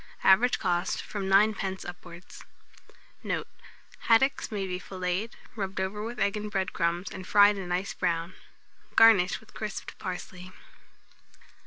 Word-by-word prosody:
Average 230 +6 +5
cost, 180 -1 -1
from 205 -2 -5
9d. 195 -1 +2
upwards. 175 0 -11 0.8
Note. - - -3 0.6
Haddocks 240 +3 +3
may 200 -2 -2
be 180 -1 -4
filleted, 185 +4 -3 0.2
rubbed 195 -3 -4
over 195 +3 -3
with 235 +2 -6
egg 200 +1 +1
and 210 0 -4
bread 190 -2 -2
crumbs, 170 +2 -1
and 185 -1 -8
fried 205 0 +6
a 185 - -6
nice 180 +2 -2
brown; 170 +1 -1 0.6
garnish 210 -5 +6
with 220 - -20
crisped 215 -2 -6
parsley. 185 0 -7
190 Hz, 135 wpm, -28 LUFS, 180-210 Hz, 0.8 s, fried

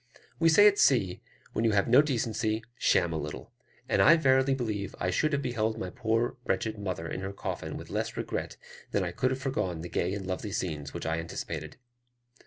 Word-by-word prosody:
We 165 0 +5
say 205 +6 +7
at 205 -1 +5
sea, 100 -9 +3 0.3
"When 110 - 0
you 115 -2 +3
have 100 -1 +2
no 125 +4 +7
decency, 115 -5 -1 0.2
sham 85 -2 +3
a 80 - -1
little;" 75 0 -7 0.4
and - - +2
I 165 - +8
verily 130 -2 +3
believe 105 -6 -3
I 90 - 0
should 155 - +1
have 140 -1 0
beheld 115 -3 -1
my 90 - -4
poor 115 +5 0 0.4
mother 95 -5 -4
in 90 - -4
her 95 0 -4
coffin - - -5
with - - -10
less - - -2
regret - - -4 0.3
than 100 - 0
I 90 - -2
could 125 +6 0
have 130 +1 -3
foregone 105 -11 -2
the 90 - -6
gay 90 +3 -1
and 100 -2 -5
lovely 95 +2 -4
scenes 75 -8 -3
which - - -5
I 80 +1 0
anticipated. 80 -2 -6
110 Hz, 200 wpm, -29 LUFS, 90-130 Hz, 0.4 s, I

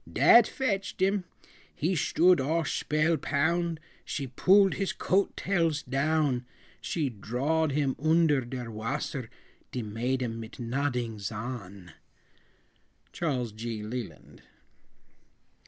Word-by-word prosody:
Dat 235 -1 +7
fetched 205 -8 -2
him 190 0 +1 0.5
he 165 +6 0
shtood 175 +1 +4
all 165 +4 +1
shpellpound; 160 +2 0 0.3
She 140 - -4
pooled 190 +10 +4
his 195 -1 -2
coat 195 +1 0
tails 165 -6 0
down, 140 -1 +1 0.4
She 155 -5 -1
drawed 135 +9 -1
him 140 -2 +1
oonder 160 -3 +4
der 120 -1 -6
wasser, 110 +1 -4 0.4
De 125 - -3
maiden 115 +2 -2
mit 115 +3 -9
nodings 120 -4 -2
on. 105 -6 -7 1.2
CHARLES 130 -9 -1
G. 110 0 -5
LELAND. 105 - -7
140 Hz, 105 wpm, -28 LUFS, 120-165 Hz, 1.2 s, Dat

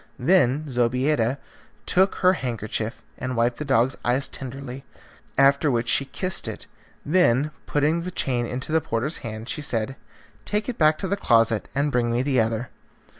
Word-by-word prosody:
Then 150 -1 +3
Zobeida 125 0 +1 0.5
took 190 +2 +3
her 185 0 +4
handkerchief 115 - -4 0.2
and 130 0 -3
wiped 120 +1 +1
the - - -4
dog's 130 -1 +2
eyes 130 +3 +2
tenderly, 135 0 -7 0.5
after 140 +2 +4
which 120 -2 0
she 135 - +2
kissed 185 +6 -2
it, - - -6 0.4
then, 150 -4 +3 0.2
putting 150 +3 +1
the 180 - -4
chain 125 -8 -1
into 130 +5 -5
the 160 0 +3
porter's 130 +5 -2
hand 110 0 -7
she 150 - -3
said, 125 -2 -1 0.5
"Take 210 +1 -2
it 250 - -4
back 155 -1 +4
to 190 - -3
the 200 +2 0
closet 115 - +2
and 145 +1 +1
bring 120 -2 +1
me 120 +2 +1
the 135 -2 +1
other." 115 +1 0
130 Hz, 170 wpm, -24 LUFS, 120-155 Hz, 0.5 s, her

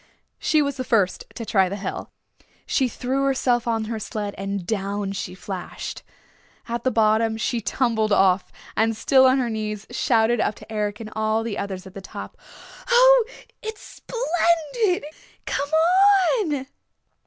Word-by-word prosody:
She 310 -1 +3
was 280 -1 -3
the 255 - -2
first 210 -7 +1
to 230 - -5
try 190 -4 +2
the 200 - -3
hill. 195 -1 -5 0.6
She 265 - +1
threw 260 +3 -2
herself 250 -3 +1
on 225 -1 0
her 220 0 -4
sled 210 -1 -4
and 195 -1 -4
down 200 0 -2
she 195 -2 -5
flashed. 185 -1 -6 0.7
At 235 0 -3
the 260 - +3
bottom 220 -1 +2
she 230 +1 -1
tumbled 220 -1 0
off, 190 -1 +3 0.2
and 225 0 +1
still 260 +3 +5
on 260 +1 +4
her 255 -2 0
knees 215 -1 -4
shouted 235 -1 +2
up 210 - 0
to - - -14
Eric 210 0 -2
and 215 -1 -8 0.3
the 215 -3 -3
others 190 -2 -5
at 190 - -11
the 195 - -8
top, - - -8 0.5
"Oh, - - +6 0.4
it's 440 -1 -7 0.2
splendid! 350 - +1 0.4
Come 285 0 -2 0.7
on!" 295 -9 -1
225 Hz, 155 wpm, -23 LUFS, 205-265 Hz, 0.7 s, Oh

